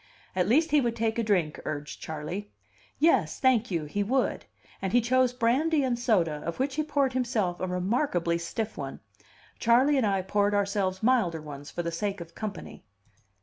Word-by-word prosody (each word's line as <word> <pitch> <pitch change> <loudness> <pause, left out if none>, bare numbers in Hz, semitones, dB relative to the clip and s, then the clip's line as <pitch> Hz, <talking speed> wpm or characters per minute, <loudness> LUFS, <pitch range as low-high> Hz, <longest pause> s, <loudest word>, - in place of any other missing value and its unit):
At 180 -1 +1
least 315 +7 +3
he 295 -1 +5
would 235 -2 -1
take 225 0 0
a - - +1
drink, 180 -8 +1
urged 150 0 -5
Charley. 160 +7 -5 0.5
Yes, 260 - +2
thank 250 -4 +3
you, 165 -5 -1
he 200 +8 -2
would; 255 +6 0 0.4
and 190 -1 -2
he 245 - +6
chose 255 +1 +3
brandy 270 +6 +2
and 245 -2 0
soda, 170 - +1
of 170 - -4
which 265 +1 -1
he 310 - 0
poured 285 -3 0
himself 230 -8 0
a 185 - -2
remarkably 180 - 0
stiff 215 +5 -4
one. 135 -1 -5 0.6
Charley 255 +5 +4
and 245 -5 +2
I 195 -2 +1
poured 205 +2 +1
ourselves 200 -1 0
milder 220 -10 +2
ones, 145 -1 -9
for 175 - -4
the 170 - -2
sake 200 +3 -2
of 170 -1 -9
company. 210 0 -7
205 Hz, 185 wpm, -28 LUFS, 175-250 Hz, 0.6 s, he